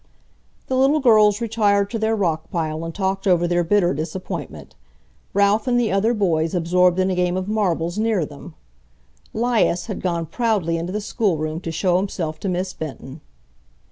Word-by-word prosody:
The 260 - -2
little 270 +4 +3
girls 215 -5 +4
retired 205 -3 +1
to 225 - -2
their 220 +1 +1
rock 165 -6 -1
pile 160 -2 -3
and 165 - -4
talked 195 0 -1
over 175 -2 +3
their 175 0 +1
bitter 180 0 +2
disappointment, 155 - -6 0.6
Ralph 200 +3 +2
and 245 -1 +2
the 230 -4 +1
other 210 +5 +2
boys 165 -5 0
absorbed 180 +1 +2
in 190 0 +1
a - - -1
game 180 0 0
of 185 0 -3
marbles 185 -4 -1
near 215 -7 +1
them. 150 +3 -12 0.8
'Lias 225 -6 +1
had 205 - -5
gone 170 -2 -1
proudly 185 -3 0
into 170 +2 -4
the 210 +2 -3
schoolroom 165 -8 -1
to 165 - -4
show 175 +2 +1
himself 175 -5 -3
to 195 - -3
Miss 185 +1 -2
Benton. 145 -1 -8
185 Hz, 170 wpm, -21 LUFS, 165-210 Hz, 0.8 s, girls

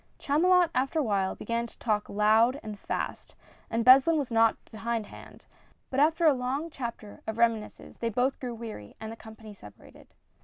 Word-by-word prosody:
Chamulot 350 +4 +3
after 270 +5 0
a 310 - +2
while 195 -5 0
began 235 +2 -3
to - - -20
talk 210 -3 -1
loud 220 +6 +3
and 210 -2 -7
fast, - - -5 0.3
and 230 0 -1
Beslin 270 +6 +7
was 275 -5 -2
not 225 0 +3
behindhand 225 -1 -6 0.2
— - - -36
but 265 - 0
after 320 +3 +3
a 305 - +7
long 270 +6 -3
chapter 235 -6 -7
of 220 0 -4
reminiscences 230 -2 -1
they 230 - -1
both 250 +4 0
grew 245 -2 -5
weary 220 - -9
and 220 0 -6
the - - -7
company 220 -1 -12
separated. 105 - -16
235 Hz, 180 wpm, -28 LUFS, 220-270 Hz, 0.3 s, Beslin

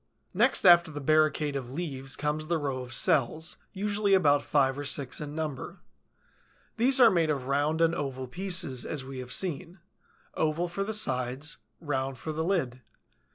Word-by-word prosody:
Next - - +2
after 175 -2 +7
the 145 -2 -6
barricade 155 0 +2
of 130 -3 -4
leaves 135 -3 -5
comes 150 +1 -2
the 170 0 +1
row 140 -4 -3
of 125 -1 -8
cells, 140 +6 0
usually 205 0 +1
about 145 -6 +4
five 135 -3 +1
or - - -4
six 140 0 -1
in 150 0 -6
number. 155 -5 -5 1.0
These 255 +3 +4
are 235 -3 +8
made 165 -3 +2
of 140 -4 -1
round 145 +4 0
and 165 0 +4
oval 135 -5 -4
pieces, 175 -6 -2
as 140 -4 -5
we 135 -1 -7
have 125 -1 -8
seen; 180 0 -2 0.6
oval 160 +3 0
for 175 +3 -3
the 220 +2 -1
sides, 130 - -2 0.2
round 135 -4 -3
for 155 +7 -5
the 160 +1 -2
lid. 135 -9 -1
150 Hz, 170 wpm, -28 LUFS, 135-170 Hz, 1.0 s, are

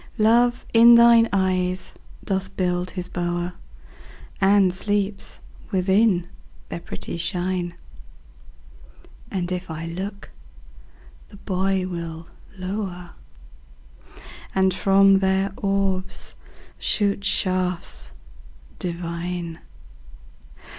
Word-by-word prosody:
Love 240 +2 +3
in 235 +1 +9
thine 235 -1 +7
eyes 185 -1 0 0.3
doth 190 -1 -3
build 180 -1 0
his 180 -2 -5
bower, 175 0 -2 0.9
And 195 -1 +5
sleeps 200 +1 -2 0.3
within 190 -1 +2 0.4
their - - -4
pretty 170 - -6
shine; 175 0 -2 1.5
And 180 -2 -3
if 180 0 -4
I 160 +1 -5
look, 195 +5 -6 1.0
the - - -14
boy 190 -1 0
will 170 -2 -6 0.3
lower, 185 -2 -5 1.4
And 190 -1 +3
from 195 +1 +5
their 190 0 +1
orbs 195 -2 -1 0.5
shoot 200 -1 +1
shafts 180 - -1 0.7
divine. 170 -1 -4
185 Hz, 85 wpm, -23 LUFS, 175-195 Hz, 1.5 s, in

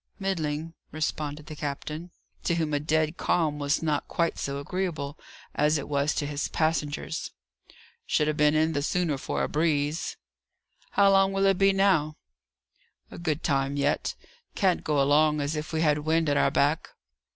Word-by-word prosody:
"Middling," 165 -5 -2 0.2
responded 150 -1 -3
the 155 - -8
captain, 150 +3 -5 0.4
to 170 - +2
whom 160 -3 -1
a 145 - +2
dead 155 +2 0
calm 155 -4 +1
was 145 +2 0
not 150 -2 0
quite 170 -1 -1
so 140 0 -3
agreeable 155 -2 -3 0.4
as 150 +1 +2
it 145 - -5
was 145 +1 0
to 145 - -1
his 145 0 -2
passengers. 155 -1 -1 0.8
"Should 150 - +2
ha' 155 - 0
been 150 0 +3
in 155 +1 +3
all - - -3
the 145 - 0
sooner 155 -2 0
for - - -2
a - - +1
breeze." 150 0 0 0.8
"How 200 -1 +5
long 195 0 +4
will 195 0 +2
it 195 -2 +3
be, 195 0 +5
now?" 185 -6 +2 0.9
"A - - -9
good 160 -2 -2
time 140 -1 0
yet. 145 +1 0 0.4
Can't 190 -4 +2
go 150 -2 +1
along 150 +2 +4
as 145 +2 -1
if 150 +1 -4
we 160 -1 0
had 150 -2 +3
wind 160 +1 +1
at 145 - +2
our - - +3
back." 145 +3 +1
155 Hz, 175 wpm, -27 LUFS, 145-165 Hz, 0.9 s, How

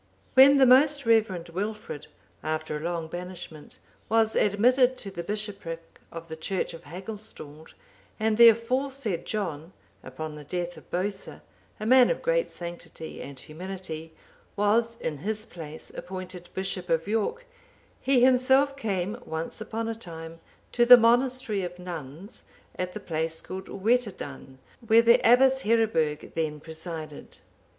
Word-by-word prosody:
When 275 +2 +8
the 270 - +6
most 280 +3 +5
reverend 210 -7 +2
Wilfrid, 205 -3 -5 0.3
after 155 0 -3
a - - -3
long 165 0 -3
banishment, 175 -3 -8 0.3
was 220 0 +3
admitted 250 +5 +3
to 195 - -6
the 175 - -5
bishopric 195 -4 -5
of 165 0 -8
the 160 - -6
church 185 +4 -2
of 165 -1 -11
Hagustald,(778) 175 -3 -9 0.5
and 220 0 +2
the 235 +1 +10
aforesaid 230 -4 -1
John, 175 -5 -4 0.3
upon 155 +4 -7
the 150 0 -9
death 175 +3 -4
of - - -15
Bosa,(779) 195 +2 -4 0.4
a - - -3
man 255 +2 +6
of - - -2
great - - +1
sanctity 170 -2 -8
and 140 -1 -9
humility, 165 0 -7 0.4
was, 225 +3 +2
in 155 -9 -4
his 215 +7 -3
place, 160 -5 -9
appointed 185 -1 -7
bishop 190 -1 -3
of 165 +2 +1
York, 225 - -1 0.6
he 265 -2 +3
himself 265 +2 +4
came, 205 -3 -2
once 160 +6 -5
upon 225 +1 -4
a 225 - -1
time, 165 -6 -9 0.3
to 240 - +3
the 245 +1 +10
monastery 240 -2 +2
of 180 -1 -5
nuns, 175 - -8 0.3
at 180 0 -3
the 215 - -5
place 160 -3 -3
called 190 0 -7
Wetadun,(780) 195 - -2 0.3
where 225 +1 +6
the 235 0 +6
Abbess 265 +3 +5
Heriburg 210 - +1
then 155 -2 -2
presided. 160 -1 -7
190 Hz, 145 wpm, -27 LUFS, 165-230 Hz, 0.6 s, the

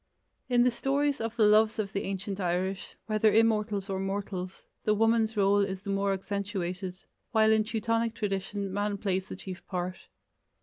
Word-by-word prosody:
In 245 -1 +4
the 250 - +4
stories 280 +3 0
of 225 0 -3
the 230 - +3
loves 215 +1 +5
of 200 -3 -3
the 200 - -1
ancient 195 +1 -4
Irish, 185 +1 -2
whether 215 0 +3
immortals 215 -3 +2
or 190 -2 -2
mortals, 195 -1 -4 0.2
the 215 - +2
woman's 225 0 +2
role 200 0 +4
is 195 -1 -1
the 200 - -3
more 195 0 +1
accentuated, 190 -2 -3 0.4
while 220 -1 +5
in 220 0 +4
Teutonic 230 +1 -1
tradition 195 -1 -3
man 205 0 -1
plays 190 -1 -1
the - - -6
chief 185 -1 -8
part. 180 0 -4
205 Hz, 170 wpm, -29 LUFS, 195-220 Hz, 0.4 s, loves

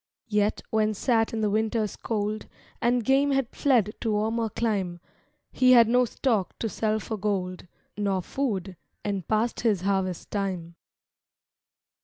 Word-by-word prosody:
Yet, 210 0 +1
when 215 -1 +2
sat 225 +1 +1
in 225 - -2
the 210 - +2
winter's 220 0 0
cold 215 -1 -3 0.3
And 240 -1 +2
game 275 +3 +4
had 270 -2 0
fled 235 -7 +2
to 225 -2 0
warmer 220 +2 0
clime, 195 -6 -1 0.5
He 255 0 +5
had 235 -2 +7
no 250 +2 +4
stock 225 -6 -1
to 225 - -2
sell 215 +1 0
for 220 +1 -5
gold, 185 -3 -2 0.3
Nor 195 -3 0
food: 195 -10 -3 0.3
and 200 -4 -2
past 220 +2 0
his 215 -6 +1
harvest 190 -2 -1
time. 185 -5 -3
215 Hz, 145 wpm, -26 LUFS, 195-230 Hz, 0.5 s, had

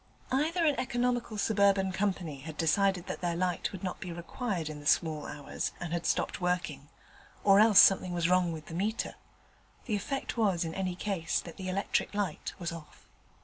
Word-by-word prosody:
Either 320 +6 +1
an 300 - +4
economical 245 -3 -1
suburban 200 -2 +3
company 185 -7 -2
had 155 +2 -8
decided 190 +2 +2
that - - -5
their 175 -1 0
light 180 -1 -1
would 190 -1 -8
not 185 - -3
be 180 - -6
required 175 - -3
in 155 -1 -6
the 145 - -6
small 155 -2 +2
hours, 145 -1 -4
and 170 -1 -4
had 170 -1 -1
stopped - - 0
working, 170 -6 -2 0.5
or 200 0 +6
else 215 -2 +7
something 185 -2 +6
was 170 -1 +1
wrong 180 -1 +3
with 155 -2 -7
the - - -9
meter; 205 +6 -1 0.7
the 220 - 0
effect 265 +6 -3
was 195 -7 +2
in 160 - -4
any 185 -1 -2
case 180 -4 -1
that 170 - -9
the 185 -1 -4
electric 200 +2 -1
light 200 -7 -2
was 170 -2 -4
off. 165 -2 -11
185 Hz, 190 wpm, -30 LUFS, 165-205 Hz, 0.7 s, else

